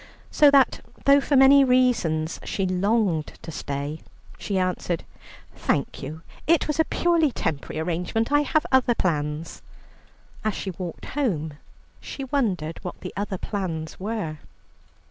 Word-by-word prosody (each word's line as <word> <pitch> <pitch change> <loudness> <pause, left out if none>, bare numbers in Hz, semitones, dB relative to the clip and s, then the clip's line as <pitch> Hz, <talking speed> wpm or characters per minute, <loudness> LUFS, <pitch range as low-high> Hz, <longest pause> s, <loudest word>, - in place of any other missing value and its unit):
So 295 - +6
that 275 -2 +4 0.2
though 280 0 +6
for 285 - 0
many 275 +1 +8
reasons 240 -12 +2
she 195 - -2
longed 185 -3 +1
to 165 - -7
stay, 145 +1 -4 0.4
she 200 - -2
answered: 180 -2 -1 0.5
"Thank - - -1
you, 155 +4 -7 0.2
it 335 0 +4
was 300 +1 -2
a 320 - +5
purely 335 -4 +2
temporary 155 - -3
arrangement; 180 - -1
I 290 0 +5
have 305 +1 +1
other 255 -2 +4
plans." 150 -3 -2 0.8
As 215 -2 0
she 195 - -4
walked 175 -1 -7
home 175 - -1 0.5
she 275 - -7
wondered 200 - -1
what 180 - -6
the 185 - -6
other 200 -1 -3
plans 170 -6 -4
were. 195 -7 -3
190 Hz, 140 wpm, -24 LUFS, 160-260 Hz, 0.8 s, many